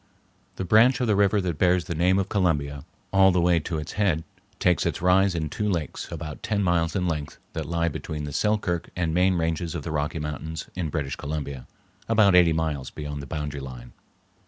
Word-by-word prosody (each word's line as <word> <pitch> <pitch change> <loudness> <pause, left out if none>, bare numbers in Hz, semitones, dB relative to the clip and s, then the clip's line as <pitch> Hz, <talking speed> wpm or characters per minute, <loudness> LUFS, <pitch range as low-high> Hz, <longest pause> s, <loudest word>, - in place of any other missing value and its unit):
The 95 - -4
branch 115 +7 +5
of 125 - +1
the 110 -3 +2
river 100 +1 +3
that 85 -5 -3
bears 90 -1 +3
the - - -3
name 90 +4 +3
of 100 0 0
Columbia 75 -8 0 0.3
all 95 0 +6
the 90 - +2
way 85 0 +3
to 80 +1 -4
its 75 - -5
head 95 -6 +1 0.3
takes 90 -1 +2
its - - -1
rise 90 +1 +3
in 80 -2 -1
two 105 +8 -2
lakes 85 -6 -3
about 75 -1 -6
ten 105 -2 0
miles 85 -2 +1
in 90 -2 0
length 75 -3 -3 0.2
that - - -4
lie 85 0 +1
between 75 -1 -4
the 75 -1 -5
Selkirk 105 -4 0
and 85 -3 -1
main 90 +2 +3
ranges 80 0 -1
of 80 - -4
the 80 - -4
Rocky 75 +1 -1
Mountains 75 +1 -5
in 90 -4 -3
British 75 -4 -3
Columbia, 70 -3 -5 0.4
about 110 -4 +5
eighty 90 -2 +6
miles 80 -5 -1
beyond 75 -1 -6
the 70 - -9
boundary 75 0 -4
line. 60 -2 -9
85 Hz, 205 wpm, -25 LUFS, 75-90 Hz, 0.4 s, all